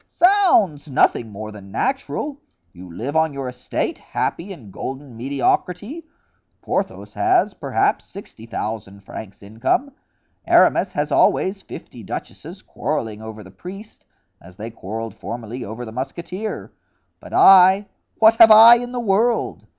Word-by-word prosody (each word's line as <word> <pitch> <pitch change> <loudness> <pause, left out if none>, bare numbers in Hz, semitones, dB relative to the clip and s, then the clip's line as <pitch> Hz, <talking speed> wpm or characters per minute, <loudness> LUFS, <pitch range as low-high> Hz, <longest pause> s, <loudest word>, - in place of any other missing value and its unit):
"Zounds! 345 - +3
nothing 125 -4 +1
more 105 +1 -8
than 100 -2 -12
natural. 275 - -3 0.3
You 90 0 -12
live 130 - -5
on 160 -1 +2
your 135 -1 -5
estate, 125 0 -4
happy 185 +4 -4
in 125 - -11
golden 135 +3 -7
mediocrity. 180 - -2 0.6
Porthos - - -3
has, 365 0 +2
perhaps, - - -1
sixty 115 - -12
thousand 105 -3 -5
francs 100 +1 -10
income. 115 - -1 0.6
Aramis - - +4
has - - -2
always 195 +1 +2
fifty 120 - -11
duchesses 100 - -8
quarreling 110 -1 -4
over 110 -1 -9
the 95 - -14
priest, 195 - -11 0.4
as 90 +1 -16
they 110 +4 -7
quarreled 110 +2 -6
formerly 120 +1 -7
over 110 +4 -7
the 110 - -9
musketeer; 170 - -6 0.5
but - - -13
I—what 195 +4 +5
have 230 -1 +9
I 225 +2 +9
in 245 +1 -6
the 250 - -3
world? 230 +2 0
140 Hz, 135 wpm, -21 LUFS, -, 0.6 s, have